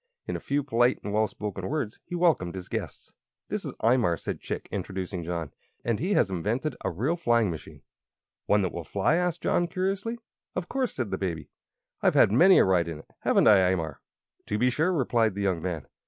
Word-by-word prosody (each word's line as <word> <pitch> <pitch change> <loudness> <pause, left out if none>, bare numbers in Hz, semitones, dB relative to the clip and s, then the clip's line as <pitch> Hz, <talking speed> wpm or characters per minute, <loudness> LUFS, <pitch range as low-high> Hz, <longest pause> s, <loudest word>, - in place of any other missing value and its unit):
In - - -3
a - - -3
few 140 +1 -1
polite 120 -1 +2
and 105 - -4
well 110 +1 +3
chosen 100 -3 -5
words 135 -7 -3
he 175 - -6
welcomed 160 - +2
his 90 -1 -7
guests. - - -6 0.4
"This - - -2
is - - -5
Imar," 115 -9 +3
said - - -4
Chick, - - -5
introducing 95 -2 -4
John; 85 -3 -4 0.3
"and 115 -3 0
he 190 +5 0
has 95 - +3
invented 115 - -1
a - - 0
real 125 - -1
flying 115 - +2
machine." 75 -4 -9 0.6
"One 105 -1 +3
that 90 - -1
will 85 - -5
fly?" 100 - +1
asked 180 -2 -1
John, 175 - +2
curiously. 195 +6 -2 0.4
"Of 180 -1 -3
course," 260 +1 -1
said 120 -7 -3
the 95 - -2
Baby. 85 -5 -3 0.5
"I've - - +3
had - - +6
many 180 - +7
a - - +6
ride 90 -3 +2
in 80 -2 -5
it 80 - -15
haven't - - +3
I, 105 - +8
Imar?" 80 -6 -2 0.5
"To 105 - -1
be 125 +3 +3
sure," 160 +8 +1
replied 120 - +1
the 100 - -3
young 95 -4 0
man. 85 -4 -3
105 Hz, 210 wpm, -27 LUFS, 90-150 Hz, 0.6 s, I